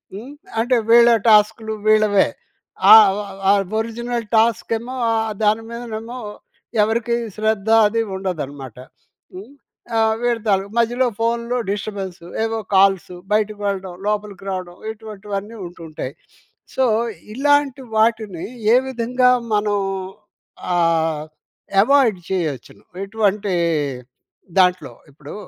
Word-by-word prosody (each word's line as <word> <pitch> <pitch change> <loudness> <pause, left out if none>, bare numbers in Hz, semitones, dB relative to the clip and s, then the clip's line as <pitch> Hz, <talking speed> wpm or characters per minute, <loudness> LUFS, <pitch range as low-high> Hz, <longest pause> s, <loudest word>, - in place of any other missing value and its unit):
హ్మ్, 245 +8 -9 0.3
అంటే 245 +1 +2
వీళ్ళ 235 0 +7 0.2
టాస్క్‌లు 220 +1 +3
వీళ్ళవే! 215 -2 +4 0.6
ఆ - - +13 0.6
ఆహ్, 200 -1 +2 0.2
ఒరిజినల్ 235 0 -4
టాస్క్ 225 0 +2
ఏమో 250 +3 -7 0.2
ఆహ్, 220 -1 0
దాని 215 +2 +3
మీదనేమో 235 +1 -6 0.6
ఎవరికీ 235 +2 0 0.2
శ్రద్ధ 215 -1 -1 0.2
అది 230 +2 0 0.2
ఉండదన్నమాట. 145 - -5 0.6
హ్మ్, 210 +9 -10 0.4
ఆహ్, 220 0 +3
వీళ్ళ 240 -1 +1
తాలూకా 195 +2 0
మధ్యలో 240 +2 +2
ఫోన్‌లో 235 +2 -1
డిస్టర్బెన్స్ 195 -3 -5 0.2
ఏవో 225 0 -2 0.2
కాల్సు 190 -2 +3 0.2
బయటకి 210 -1 0
వెళ్ళడం, 190 -2 -3
లోపలికి 205 -2 -3
రావడం 180 -2 -6
ఇటువంటివన్నీ 210 -1 -7
ఉంటూ 170 -1 -14
ఉంటాయి. 140 -3 -6 0.6
సో, 265 - +2 0.5
ఇలాంటి 285 0 +2 0.2
వాటిని 220 -6 +1 0.3
ఏ - - +7
విధంగా 250 0 +1 0.3
మనం 205 0 +1 1.0
ఆహ్, 165 -3 +1 0.6
ఎవాయిడ్ 235 -6 +3
చేయొచ్చును? 160 -9 -4 0.2
ఇటువంటి 205 -1 -1 1.1
దాంట్లో. 180 0 +2 0.2
ఇప్పుడు 145 +1 -11
215 Hz, 105 wpm, -20 LUFS, 195-230 Hz, 1.1 s, ఆ